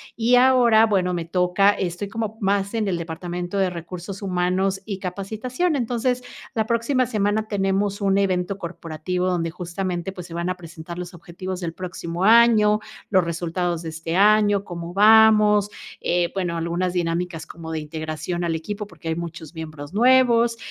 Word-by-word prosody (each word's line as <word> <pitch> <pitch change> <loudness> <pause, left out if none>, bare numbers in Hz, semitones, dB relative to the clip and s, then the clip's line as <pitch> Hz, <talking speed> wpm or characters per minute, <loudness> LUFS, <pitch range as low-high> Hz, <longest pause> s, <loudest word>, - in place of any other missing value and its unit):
y 235 +2 +3
ahora, 245 -3 +5
bueno, 190 -4 +1
me 170 -2 -3
toca 180 +3 +3
estoy 185 0 -3
como 220 +1 -4
más 200 +1 0
en 220 -2 0
el 180 -3 -1
departamento 175 +3 -5
de 190 -2 +1
recursos 180 +3 -7
humanos 190 +1 0
y 200 -3 -5
capacitación. 220 - -2
Entonces, 250 0 -1 0.3
la 220 -1 -1
próxima 235 +3 +1
semana 215 -1 0
tenemos 200 0 0
un 195 -1 +2
evento 190 0 0
corporativo 170 0 -4
donde 175 -2 0
justamente, 180 +1 -4
pues, 180 -2 -9
se 165 - -9
van 170 +1 -2
a - - -3
presentar 170 0 -9
los 180 0 -7
objetivos 185 +1 -7
del 165 -2 -3
próximo 180 0 -4
año, 220 -2 +6 0.3
los 190 -3 +4
resultados 170 0 -2
de 165 - -5
este 165 +1 -4
año, 205 0 +4
cómo 170 -2 -7
vamos, 210 0 +6 0.3
eh, 175 0 +1
bueno, 175 -3 -1
algunas 170 +2 -1
dinámicas 170 -1 -2
como 160 -1 -9
de 160 - -2
integración 155 +2 -4
al 170 -1 0
equipo, 200 +6 -4
porque 200 - -12
hay 160 - 0
muchos 165 -1 -7
miembros 155 +1 -8
nuevos, 240 -1 +4
185 Hz, 165 wpm, -23 LUFS, 170-210 Hz, 0.3 s, año